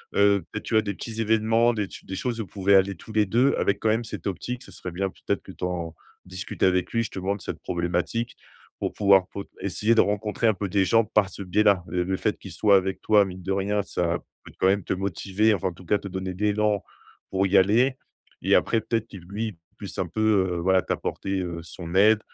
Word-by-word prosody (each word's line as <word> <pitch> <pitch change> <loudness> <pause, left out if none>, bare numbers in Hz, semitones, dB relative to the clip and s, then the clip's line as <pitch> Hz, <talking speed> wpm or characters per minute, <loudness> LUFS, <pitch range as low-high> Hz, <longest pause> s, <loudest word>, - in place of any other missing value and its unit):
heu, 100 -1 +4
peut-être, 110 - -5
tu - - -5
vois, 110 - +5
des 100 -2 -4
petits 115 +2 -5
événements, 115 +2 +3
des 105 - 0
ch 95 - -10
des 95 - -5
choses 115 +2 -2
où - - -4
vous - - -19
pouvez 100 0 +2
aller 95 0 +4
tous 110 +6 -12
les 105 -1 +3
2 125 +7 +3
avec, 100 0 +1
quand 110 - +1
même, 110 +2 +1
cette 110 - -8
optique. 120 +7 -4
Ce - - -14
serait - - -7
bien, 95 +2 -2
peut-être, - - -3
que - - -10
tu - - -11
en 85 -2 -2 0.3
discutes 90 -1 -6
avec 90 -1 +2
lui, 115 - +1
justement, 100 -3 -2
de 100 - -11
cette - - -5
problématique, 90 +7 -2 0.4
pour - - -2
pouvoir 100 -3 +4
pot 100 - -7
essayer 100 +4 +1
de 115 - +6
rencontrer 105 +2 0
un 110 - +3
peu 100 +1 -3
des 95 +1 +2
gens 115 +4 +4
par 105 -2 +2
ce 100 - -8
biais-là. 100 0 +3
Heu, 90 0 +1
le 95 +1 -1
fait - - 0
qu'il - - -10
soit 100 -2 +4
avec 95 0 -1
toi, 105 -2 +5
mine 95 -1 -8
de 95 - -3
rien, 100 +1 0
ça 85 -2 -1 0.2
peut, - - -13
quand 95 - +3
même, 100 0 +2
te - - -1
motiver, 100 +3 +1
enfin, 95 -1 -1
en - - -10
tout 90 +2 -15
cas, 105 - +2
te - - -7
donner 95 0 -4
de 90 - -11
l'élan 105 -1 +1 0.5
pour 95 0 +1
y 95 +1 +4
aller 115 +8 +4 0.4
et - - +3
après, 115 - +2
peut-être 115 -1 -2
qu'il, 95 -5 -11
lui, 105 -1 -4 0.2
puisse - - -8
un - - 0
peu, 110 - -3 0.3
heu, - - -2
voilà, 95 +2 +3
t'apporter, 95 +1 -3
heu, 85 -2 -4
son 85 +1 -8
aide 105 +3 +6
100 Hz, 245 wpm, -25 LUFS, 95-110 Hz, 0.5 s, de